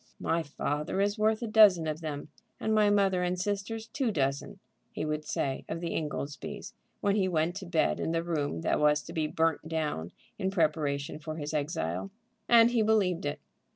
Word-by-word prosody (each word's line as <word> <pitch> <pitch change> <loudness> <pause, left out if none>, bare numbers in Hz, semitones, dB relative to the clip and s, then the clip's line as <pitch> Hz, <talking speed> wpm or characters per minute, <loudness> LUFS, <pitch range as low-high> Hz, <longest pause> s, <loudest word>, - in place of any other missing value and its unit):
"My 165 +1 0
father 150 +2 -3
is 205 +2 +1
worth 220 +2 +2
a - - -2
dozen 210 -6 +6
of 155 +1 -3
them, 150 -2 -5 0.3
and 220 - 0
my 210 -1 +4
mother 195 -3 +3
and 180 0 -1
sisters 205 +3 -2
two 260 +1 -1
dozen," 140 -5 -1 0.3
he - - -3
would 155 0 -2
say 135 -1 -2
of 165 - -3
the 170 0 -3
Ingoldsbys 150 -2 -4 0.3
when 200 0 +2
he 195 -3 +2
went 165 -1 +1
to 190 -3 -7
bed 165 -3 +1
in - - -1
the 165 0 0
room 145 - -2
that - - +1
was 150 0 +3
to - - -9
be 155 -1 0
burnt 160 0 0
down 150 - -2 0.3
in 190 -2 0
preparation 150 -5 0
for 155 0 -6
his 150 -1 -5
exile. 140 - -2 0.4
And 235 0 +7
he 240 -2 +2
believed 195 -7 +2
it. 145 - -3
165 Hz, 190 wpm, -29 LUFS, 150-200 Hz, 0.4 s, And